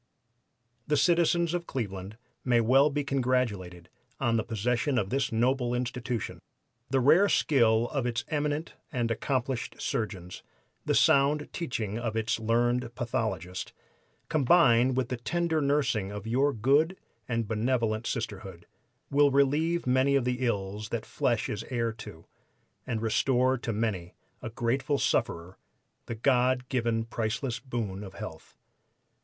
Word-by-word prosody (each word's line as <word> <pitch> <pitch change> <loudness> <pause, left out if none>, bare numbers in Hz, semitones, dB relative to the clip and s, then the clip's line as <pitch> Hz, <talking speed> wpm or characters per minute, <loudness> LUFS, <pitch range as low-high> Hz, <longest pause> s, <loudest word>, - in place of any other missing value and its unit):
"The 150 - +2
citizens 170 +2 +3
of 175 -1 -3
Cleveland 100 -4 -5 0.3
may 120 -2 +3
well 135 +6 +5
be 145 0 -1
congratulated 120 -11 -1 0.3
on 120 -4 +1
the 110 - +1
possession 120 +5 0
of 100 -4 -1
this 135 +1 0
noble 125 +1 +1
Institution. 125 -2 -3 0.5
The 135 - +2
rare 165 +10 +5
skill 115 -8 +3
of 135 -4 -1
its 120 0 -2
eminent 150 +1 -2 0.2
and 120 -5 -1
accomplished 130 +1 -2
surgeons, 95 -5 -4 0.5
the - - +2
sound 145 +2 +3
teaching 115 - -3
of 115 -2 -3
its 110 0 0
learned 120 +1 0
pathologist, 110 -8 -3 0.5
combined 130 -5 +4
with 130 -2 0
the 125 - -2
tender 165 +5 0
nursing 140 -8 +1
of 105 0 -7
your 130 +6 +2
good 140 - +2 0.3
and 115 -3 -1
benevolent 115 0 0
Sisterhood, 95 -6 -5 0.5
will 145 +1 +5
relieve 145 +5 +2
many 130 +2 +3
of 135 -3 +2
the 125 +1 -1
ills 105 -1 -3
that 115 -2 -3
flesh 120 -3 0
is 105 - -4
heir 115 -3 0
to, 95 -7 -11 0.6
and 115 -2 -2
restore 125 +3 +2
to 120 - -3
many 105 -5 -2 0.3
a 120 - -5
grateful 120 +5 0
sufferer 85 -5 -1 0.5
the 120 - -4
God 125 +1 +2
given 115 -3 0
priceless 115 +2 -2
boon 110 -7 -4
of 95 -2 -10
health. - - -9
120 Hz, 140 wpm, -28 LUFS, 110-135 Hz, 0.6 s, well